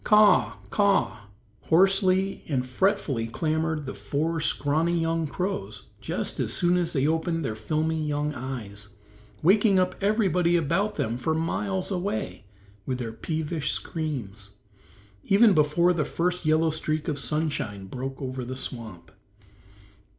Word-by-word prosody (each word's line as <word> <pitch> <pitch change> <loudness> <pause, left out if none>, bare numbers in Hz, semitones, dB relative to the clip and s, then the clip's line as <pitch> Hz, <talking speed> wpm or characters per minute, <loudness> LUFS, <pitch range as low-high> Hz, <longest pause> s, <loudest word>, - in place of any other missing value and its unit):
"Caw 210 - +5
r 210 -1 +8
r, - - -2
caw 205 - +2
r 200 -1 +5
r," 105 - -14 0.5
hoarsely 190 +2 +3
and 130 -4 0
fretfully 130 - 0
clamored 160 +4 -1
the 135 - -5
four 145 +11 -2
scrawny 160 +3 +1
young 165 -1 0
crows 105 - -4
just - - -3
as - - 0
soon 175 0 +3
as 175 -2 0
they 140 -4 +1
opened 165 0 0
their 110 - -2
filmy 155 +8 -1
young 150 0 -1
eyes, 110 -7 -5 0.5
waking 200 +3 +5
up 185 0 +2
everybody 190 -5 +2
about 170 +6 +1
them 115 +2 -1
for 155 +5 -1
miles 185 +4 -2
away 110 - -3 0.4
with 130 +3 -2
their 115 -3 -5
peevish 155 +3 -2
screams, 110 - -5 0.7
even 205 +2 +6
before 165 +3 +3
the 160 -3 0
first 175 +2 -1
yellow 155 +1 +3
streak 155 0 -2
of 150 -3 -1
sunshine 140 -11 -2
broke 130 +5 -6
over 130 -1 -4
the 130 +2 -5
swamp. 110 -10 -6
155 Hz, 145 wpm, -26 LUFS, 130-175 Hz, 0.7 s, r